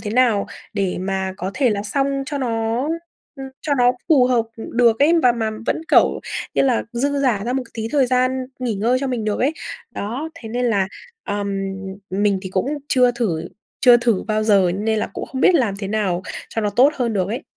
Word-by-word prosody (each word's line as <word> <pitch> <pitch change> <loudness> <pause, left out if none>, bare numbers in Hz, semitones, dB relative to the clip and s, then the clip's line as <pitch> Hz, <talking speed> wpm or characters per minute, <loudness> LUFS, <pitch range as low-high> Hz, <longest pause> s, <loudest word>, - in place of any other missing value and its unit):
thế 205 0 -5
nào 230 -3 +3 0.3
để 195 -4 -1
mà 190 0 -2
có 190 0 -4
thể 260 -4 +2
là 200 -1 -1
xong 275 +6 0
cho 285 +1 -3
nó, 230 -1 -1 0.5
ừm, 270 0 -7
cho 290 -2 +1
nó 245 0 +5 0.2
phù 275 -6 +5
hợp 240 -3 +2
được 230 0 +2
ấy, 295 +4 +5
và 245 - +5
mà 225 -2 -2 0.2
vẫn, - - 0
kiểu, - - +4 0.3
như - - +3
là, 255 -4 +2
dư 280 +4 0
giả 240 -7 +1
ra 245 - -1
một 260 0 0
tí 225 -1 -3
thời 275 -4 +3
gian 255 +1 +1
nghỉ 245 -4 -1
ngơi 235 +6 +1
cho 275 - -1
mình 245 -4 -2
được 210 -1 -1
ấy. 275 +5 +2 0.4
Đó, 245 +10 -4
thế 245 -9 -9
nên 245 +3 -1
là, 200 -5 +1 0.4
ờm, 205 0 -2 0.6
mình 200 +1 +1
thì 190 - -5
cũng 190 +4 0 0.2
chưa 250 -2 +4
thử 200 -10 -2 0.3
chưa 245 -2 +8
thử 235 -4 +1
bao 215 0 +1
giờ 200 -4 +4
nên 220 +1 0
là - - -1
cũng - - -5
không 260 - -5
biết 365 - +5
làm 230 -11 +2
thế 195 -2 -4
nào 195 -4 0 0.3
cho 225 - -2
nó 210 - 0
tốt 255 +8 +5
hơn 240 -4 0
được 190 -2 0
ấy. 240 +9 -4
230 Hz, 220 wpm, -21 LUFS, 205-255 Hz, 0.6 s, chưa